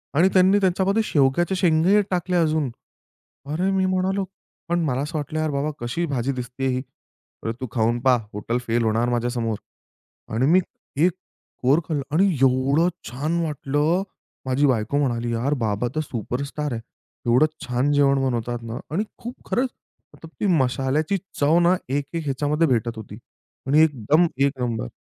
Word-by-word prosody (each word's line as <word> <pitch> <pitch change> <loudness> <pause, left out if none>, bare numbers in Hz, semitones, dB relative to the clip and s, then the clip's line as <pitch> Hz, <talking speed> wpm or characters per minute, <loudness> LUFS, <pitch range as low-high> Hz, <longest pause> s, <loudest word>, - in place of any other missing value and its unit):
आणि 175 +6 +5
त्यांनी 190 +2 +5
त्यांच्यामध्ये 190 +2 +2
शेवग्याच्या 150 +6 +2
शेंगे 180 +4 +4
टाकल्या 180 0 +1
अजून. 155 -3 +1 0.8
अरे 160 +7 -1
मी 190 -1 +2
म्हणालो 185 +1 0 0.5
पण 175 0 +2
मला 130 -2 0
असं 150 +3 -3
वाटलं, 155 +1 -3
"यार 155 0 0
बाबा 140 +2 -1
कशी 120 +9 -2
भाजी 135 -4 -1
दिसतेय 125 +1 -4
ही? 130 0 0 0.6
अरे 115 - -1
तू 130 - -3
खाऊन 120 0 +1
पहा 130 +1 +4 0.2
हॉटेल 105 +4 -2
फेल 115 +1 +1
होणार 115 +2 +1
माझ्यासमोर." 120 -2 -1 0.8
आणि 115 +4 +2
मी 185 - +6 0.5
एक 180 - +3 0.5
कोर 135 +5 +4
खाल्लं 150 -4 -1
आणि 190 +4 +5
एवढं 135 +6 +3 0.2
छान 150 +8 -1
वाटलं. 150 +3 0 0.4
माझी 130 +2 +2
बायको 120 +1 +1
म्हणाली, 120 -4 0
"यार 125 +5 0
बाबा 105 +3 0
तर - - +1
सुपरस्टार 140 +4 -4
आहे. 115 - -4 0.4
एवढं 120 +5 +5 0.2
छान 125 +3 0
जेवण 140 -1 +3
बनवतात 120 -1 -2
ना." 115 +2 -5
आणि 185 +7 0
खूप 240 +2 -7
खरंच 255 +2 +1 0.5
मतलब 165 - -12
ती - - 0 0.2
मशाल्याची 135 +8 0 0.2
चव 150 +4 +4
ना, 175 +1 +4
एक-एक 145 +4 -2
ह्याच्यामध्ये 145 +4 +1
भेटत 120 -3 0
होती 105 -1 -9 0.5
आणि 145 +3 +5
एकदम 150 +3 +3 0.2
1 140 - +2
नंबर. 120 - -2
140 Hz, 160 wpm, -23 LUFS, 125-165 Hz, 0.8 s, मी